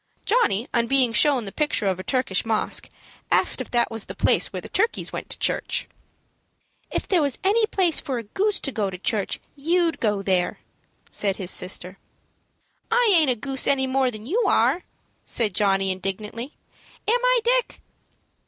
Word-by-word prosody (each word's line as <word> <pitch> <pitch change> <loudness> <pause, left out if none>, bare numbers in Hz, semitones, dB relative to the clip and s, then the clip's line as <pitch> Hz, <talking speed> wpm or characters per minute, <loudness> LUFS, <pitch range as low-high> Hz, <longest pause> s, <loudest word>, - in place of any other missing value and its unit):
Johnny, 265 - +2
on 235 -1 +1
being 260 -3 +3
shown 255 0 +3
the 195 - -6
picture 295 -6 -1
of 190 -2 0
a - - -5
Turkish 255 -7 0
mosque, 225 -1 -1 0.4
asked - - +4
if - - -7
that 240 -1 +1
was 225 -2 -4
the - - -8
place - - +3
where - - -4
the - - -9
turkeys 455 +4 -1
went - - -6
to - - -7
church. - - 0 1.0
"If - - -3
there 365 -4 +3
was 280 -3 -1
any 430 +3 +3
place 370 -7 +2
for 265 -3 -3
a 230 - -4
goose 400 - -1
to 275 - -2
go 210 -5 -1
to 185 - -7
church, 200 +2 -2 0.2
you'd 330 +2 +1
go 205 -3 0
there," 185 -2 0 0.5
said 195 -2 0
his 190 -2 -3
sister. 185 +1 -3 0.9
"I 470 -3 +4
aint 315 -5 +5
a 250 - +2
goose 265 +3 -1
any 270 -1 +3
more 260 0 +1
than 215 -2 -8
you 420 - 0
are," 360 - +2 0.4
said 220 -5 -1
Johnny, 195 -1 +2
indignantly; 210 - -5 0.5
"am 480 +3 +2
I, - - +4
Dick?" - - +1
250 Hz, 180 wpm, -24 LUFS, 205-340 Hz, 1.0 s, aint